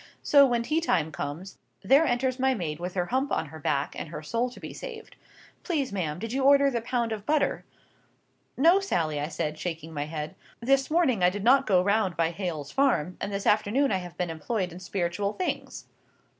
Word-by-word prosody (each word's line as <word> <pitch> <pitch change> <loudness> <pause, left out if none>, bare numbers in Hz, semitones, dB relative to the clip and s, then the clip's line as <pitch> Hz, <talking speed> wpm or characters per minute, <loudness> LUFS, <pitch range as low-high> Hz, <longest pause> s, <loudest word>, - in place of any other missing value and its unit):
So, 280 -1 +6
when 240 -2 0
tea 310 +7 0
time 165 - +1
comes, 145 +7 -6 0.2
there 275 +10 +5
enters 255 +1 0
my 265 0 +2
maid 155 -7 -4
with 180 +1 -5
her 180 -2 0
hump 260 +8 -1
on 155 - -1
her 160 +2 -10
back, 140 -1 -1
and - - -6
her 155 -1 -7
soul 235 +9 -1
to 245 - -13
be - - -8
saved. 455 -3 -9 0.5
'Please, 290 - -2
ma'am, 160 -6 -2
did 225 +5 -5
you 270 0 0
order 280 0 +5
the 235 -2 -1
pound 235 -1 -1
of 215 -2 -4
butter?'—'No, 310 - -1
Sally,' 160 - -1
I 145 - -2
said, 155 -1 -3
shaking 165 -2 -5
my 145 -1 -2
head, 150 0 -5 0.3
'this 270 +3 +2
morning 305 - +2
I 180 - +6
did 200 +2 -5
not 270 +4 +5
go 185 -3 +4
round 200 -3 +1
by 165 0 +1
Hale's 165 -6 -4
farm, 235 - +1
and 205 - -3
this 200 0 -3
afternoon 220 +7 +2
I 195 - +2
have 175 -2 -8
been 180 -2 -2
employed 180 +4 -2
in 175 - -9
spiritual 185 +1 -2
things. 365 - -4
200 Hz, 205 wpm, -27 LUFS, 165-265 Hz, 0.5 s, So